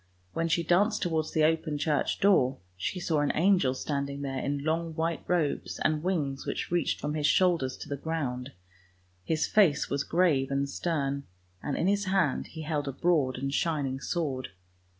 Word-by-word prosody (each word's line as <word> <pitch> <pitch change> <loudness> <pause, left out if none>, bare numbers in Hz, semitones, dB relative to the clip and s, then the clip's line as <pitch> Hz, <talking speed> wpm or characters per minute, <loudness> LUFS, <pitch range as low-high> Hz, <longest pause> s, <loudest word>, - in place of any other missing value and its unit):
When 165 - 0
she 170 +1 +1
danced 205 +6 +2
towards 160 -3 -1
the 155 - +2
open 155 -1 +1
church 150 0 0
door, 135 -10 +4 0.2
she 95 - -3
saw 165 -3 0
an 145 - +2
angel 175 -7 +3
standing 140 0 -3
there 135 -1 -3
in 140 +1 -2
long 160 +1 -1
white 165 0 -1
robes 170 -5 0
and 155 -1 +1
wings 150 -7 -1
which - - -4
reached 175 0 +1
from 150 0 -2
his 150 -1 +1
shoulders 165 -6 +2
to - - -8
the 140 - -3
ground, 140 -4 -3 0.7
his 160 - 0
face 170 -9 +3
was 140 0 0
grave 160 -7 +2
and 140 0 0
stern, 140 -3 -2 0.4
and 145 - -2
in - - 0
his 200 +1 +2
hand 185 -8 +1
he 160 -1 -8
held 150 -2 -2
a - - -1
broad 140 -3 +1
and 135 +1 -3
shining 140 -5 0
sword. 140 -4 -2
155 Hz, 180 wpm, -29 LUFS, 140-170 Hz, 0.7 s, door